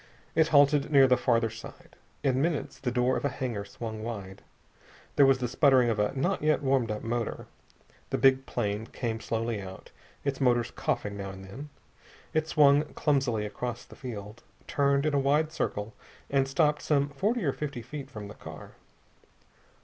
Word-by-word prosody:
It 160 0 +4
halted 145 -1 +4
near 135 -2 +7
the 130 -1 +5
farther 115 -3 +1
side. 115 0 -12 0.3
In 130 -1 +2
minutes 160 -2 -1
the 125 - -1
door 125 +1 +1
of - - -5
a 145 - +2
hangar 125 -6 -3
swung 110 +1 -7
wide. 100 -5 -6 0.7
There 140 - +6
was 135 -1 +5
the 125 -1 -2
sputtering 130 -2 +4
of 110 - -2
a 105 - +2
not 175 +9 0
yet 150 -1 +2
warmed 130 -4 +2
up 105 0 -3
motor. 115 0 -3 0.6
The - - 0
big 135 +1 +4
plane 105 -1 -2
came 115 -2 -3
slowly 115 -1 -2
out, 95 -1 -10 0.3
its 140 -1 -1
motors 120 -3 +2
coughing 100 -1 -2
now 100 -1 -5
and 95 0 -9
then. 135 +10 -9 0.6
It 155 0 +1
swung 145 -1 +5
clumsily 135 -7 +1
across 120 +3 -5
the - - -14
field, 110 -4 -8 0.2
turned 140 0 +2
in 155 - +1
a 140 - +3
wide 150 +3 +2
circle, 105 -9 -3 0.4
and 135 -1 +2
stopped 150 +2 +2
some 145 -1 +1
forty 205 - -1
or 140 - +1
fifty 140 -5 -5
feet 140 +2 -7
from 105 -6 -8
the 100 - -9
car. - - -10
130 Hz, 180 wpm, -28 LUFS, 115-140 Hz, 0.7 s, near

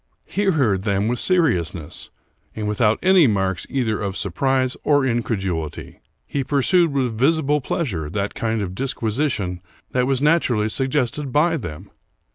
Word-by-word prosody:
He 205 +3 -2
heard 130 - +2
them 100 0 0
with 120 +1 -1
seriousness, 90 - 0 0.5
and 105 -1 -3
without 105 +1 +2
any 185 -4 +6
marks 95 -4 -1
either 115 -6 -1
of 100 -1 -3
surprise 130 +6 0
or 145 -1 +3
increduHty. 95 - -2 0.3
He 140 - -2
pursued 155 +5 +2
with 130 -5 -1
visible 150 +1 +2
pleasure 95 - -2
that 100 +3 -2
kind 110 -2 -1
of 90 -2 -5
disquisition 110 -6 -2 0.3
which 125 0 +1
was 135 -2 +1
naturally 130 -8 +2
sug 135 +4 0
gested 140 0 -1
by 165 +5 +3
them. 85 - -7
120 Hz, 145 wpm, -21 LUFS, 100-145 Hz, 0.5 s, any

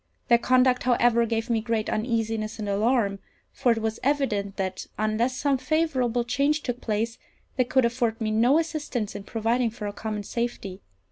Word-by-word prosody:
Their 235 -1 +6
conduct, 255 +1 +3
however, 240 -1 +3
gave 225 0 -1
me 230 -3 +1
great 225 -1 -1
uneasiness 225 -1 -1
and 210 -2 -4
alarm; 200 0 +1 0.3
for 250 -3 +1
it 225 -1 0
was 220 0 -2
evident 235 -8 0
that, 190 -1 -3
unless 220 +4 0
some 280 -3 +1
favourable 260 -7 +1
change 280 +5 +1
took 245 -1 -3
place, 225 +2 -2 0.4
they 255 - +2
could 255 0 +3
afford 235 -1 0
me 220 -2 -1
no 240 +7 +4
assistance 295 -9 -2
in 200 - -7
providing 230 +2 0
for 220 -1 -7
our 205 - -3
common 215 -1 -4
safety. 210 -4 -4
235 Hz, 175 wpm, -26 LUFS, 215-255 Hz, 0.4 s, Their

